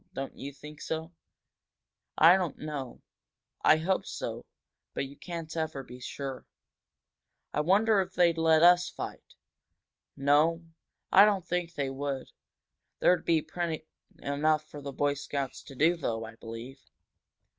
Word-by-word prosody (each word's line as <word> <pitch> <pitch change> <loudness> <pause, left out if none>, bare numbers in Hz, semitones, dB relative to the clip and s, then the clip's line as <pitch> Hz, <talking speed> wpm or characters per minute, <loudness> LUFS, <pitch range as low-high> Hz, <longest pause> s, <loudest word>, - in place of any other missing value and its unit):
Don't 135 0 -5
you 140 - -7
think 150 +2 -12
so?" 160 +1 -4 1.1
"I 165 +3 +8
don't 180 -5 -1
know 145 -5 -6 0.6
I 155 - +6
hope 185 +4 0
so. - - -5 0.5
But - - -1
you 135 +1 -11
can't 165 -2 -7
ever 160 -4 -2
be 125 0 -11
sure." 135 +1 -6 1.1
"I 150 - +1
wonder 200 +5 +4
if 185 - -6
they'd 170 -2 +4
let 160 0 +5
us 175 0 +6
fight?" - - -8 0.8
"No, 150 +4 +3 0.5
I 195 - +9
don't 200 -4 +3
think 175 -1 -2
they 140 -2 -1
would, 135 -1 -3
Dick. - - -24 0.7
There'd 180 - +3
be 160 -2 +3
plenty 160 -1 -3 0.8
for 150 -1 -10
the 140 0 -5
Boy 145 +1 +1
Scouts 140 -1 -4
to 135 - -11
do 160 +6 +4
though, 115 -8 -3
I 110 - -10
believe." 115 +4 -9
155 Hz, 145 wpm, -29 LUFS, 135-170 Hz, 1.1 s, I